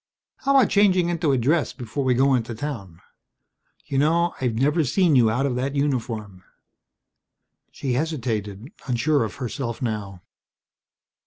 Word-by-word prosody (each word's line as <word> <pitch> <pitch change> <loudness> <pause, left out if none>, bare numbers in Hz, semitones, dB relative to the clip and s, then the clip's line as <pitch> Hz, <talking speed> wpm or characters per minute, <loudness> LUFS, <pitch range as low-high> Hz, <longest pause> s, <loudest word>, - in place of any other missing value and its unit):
How 275 +1 +1
about 265 - +4
changing 185 -4 +3
into 165 -4 0
a 135 - +2
dress 140 +2 +1
before 125 +4 -4
we 130 -1 +2
go 135 +2 +3
into 120 -2 -1
town. 110 - -6 0.8
You 135 - -1
know, 170 +4 +2
I've 125 -3 0
never 150 +7 +2
seen 160 +4 +2
you 120 -4 +5
out 125 +5 0
of 130 -3 -1
that 135 +3 -2
uniform?" 115 -9 -2 1.3
She 130 -3 -3
hesitated, 115 -7 -3 0.2
unsure 135 +2 +1
of 110 - -5
herself 120 -2 -4
now. 105 -6 -4
130 Hz, 145 wpm, -23 LUFS, 115-150 Hz, 1.3 s, you